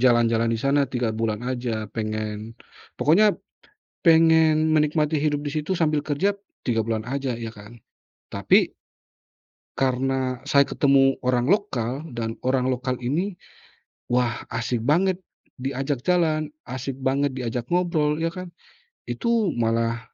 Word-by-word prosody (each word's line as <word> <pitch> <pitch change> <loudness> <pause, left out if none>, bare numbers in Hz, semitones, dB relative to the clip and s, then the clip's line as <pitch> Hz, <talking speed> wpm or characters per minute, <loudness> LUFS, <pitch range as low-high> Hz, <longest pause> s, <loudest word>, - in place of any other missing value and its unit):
jalan-jalan 115 -2 +3
di 115 - +1
sana 140 +2 +1
3 120 -4 -1
bulan 110 0 -2
aja 120 -3 -2
pengen, 110 0 -4 0.4
pokoknya 200 +7 +4 0.7
pengen 160 -1 +5
menikmati 150 0 +1
hidup 145 -1 0
di 145 - -3
situ 155 +4 -1
sambil 155 -3 +1
kerja 180 +8 0 0.3
3 115 -2 +1
bulan 110 0 -3
aja 135 -2 -2
ya 115 -1 -6
kan, 105 +3 -13 0.5
tapi - - +3 1.1
karena 130 -1 0
saya 140 -1 +5
ketemu 135 -1 +3
orang 125 +3 +2
lokal, 145 - 0
dan 115 -1 -4
orang 130 0 +2
lokal 130 0 -1
ini 170 +11 -1 0.7
wah 120 -1 0
asik 120 0 -1
banget 180 +5 +2 0.4
diajak 135 +1 -2
jalan, 160 -4 +2 0.2
asik 130 +1 -4
banget 135 0 +1
diajak 120 -1 -3
ngobrol, 170 -4 +1
ya 165 0 0
kan. 180 0 -7 0.6
Itu 230 - 0
malah 115 0 +1
135 Hz, 130 wpm, -24 LUFS, 120-155 Hz, 1.1 s, pengen